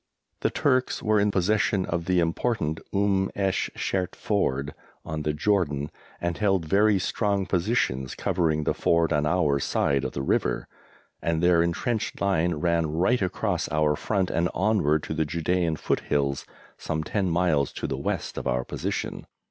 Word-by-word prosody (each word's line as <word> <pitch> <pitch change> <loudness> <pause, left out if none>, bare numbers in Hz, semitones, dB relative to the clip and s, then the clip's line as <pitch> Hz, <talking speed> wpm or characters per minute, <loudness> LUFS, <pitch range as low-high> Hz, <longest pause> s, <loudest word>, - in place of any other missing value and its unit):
The - - +1
Turks 130 -2 +1
were 110 -1 +3
in 105 +1 +3
possession 100 0 +1
of 85 0 -2
the 90 0 +2
important 85 -1 0
Umm 100 -1 +1
esh 95 -2 0
Shert 90 -1 -2
Ford 70 -9 -1 0.3
on 80 -1 -4
the 75 - 0
Jordan, 75 -4 0 0.3
and 85 -1 -2
held 95 -5 +2
very 100 +5 +4
strong 100 +1 0
positions 85 - 0
covering 80 -4 0
the - - +1
ford 85 -1 +2
on 75 0 +1
our 75 -4 +2
side 70 0 +1
of - - -3
the 70 - -3
river, - - 0 0.5
and 85 0 0
their 85 -1 +5
entrenched 105 +7 -1
line 90 -4 +1
ran 85 0 +1
right 95 +10 +2
across 90 -2 -1
our 75 -1 +2
front 95 +2 -1
and 85 +1 +1
onward 90 -7 +2
to - - -4
the 80 0 +1
Judæan 85 +1 0
foothills, 70 0 -1 0.3
some 80 0 -2
ten 95 +3 -1
miles 80 -5 +2
to - - -5
the - - -2
west - - -3
of - - -5
our 65 0 0
position. - - -4
85 Hz, 165 wpm, -26 LUFS, 75-100 Hz, 0.5 s, their